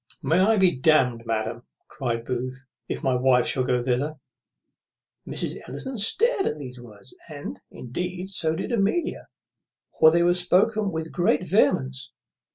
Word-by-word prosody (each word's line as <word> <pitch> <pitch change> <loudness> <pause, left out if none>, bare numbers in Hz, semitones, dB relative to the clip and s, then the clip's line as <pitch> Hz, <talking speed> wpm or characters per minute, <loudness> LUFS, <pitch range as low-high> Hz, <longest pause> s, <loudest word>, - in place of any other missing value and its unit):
"May 165 +3 +2
I 215 +4 +4
be 185 -3 +4
damned, 125 -5 +2
madam," 115 +1 -2 0.3
cries 115 -4 -3
Booth, 130 +2 -4 0.3
"if - - -4
my 130 - +2
wife 125 0 +3
shall 130 - +3
go 125 -1 0
thither." 135 +5 -1 1.1
Mrs. - - -3
Ellison 265 0 -5
stared 390 - +3
at 150 - -2
these 125 -4 -9
words, 105 -1 -14 0.2
and, 145 -10 -8
indeed, 180 +9 -5
so 160 -4 -1
did 190 - -4
Amelia; 235 - -1 0.7
for 160 - +8
they 170 +2 +2
were 175 0 +4
spoke 180 +4 +2
with 165 -7 -3
great 180 0 +1
vehemence. 135 - +1
155 Hz, 150 wpm, -24 LUFS, 125-185 Hz, 1.1 s, for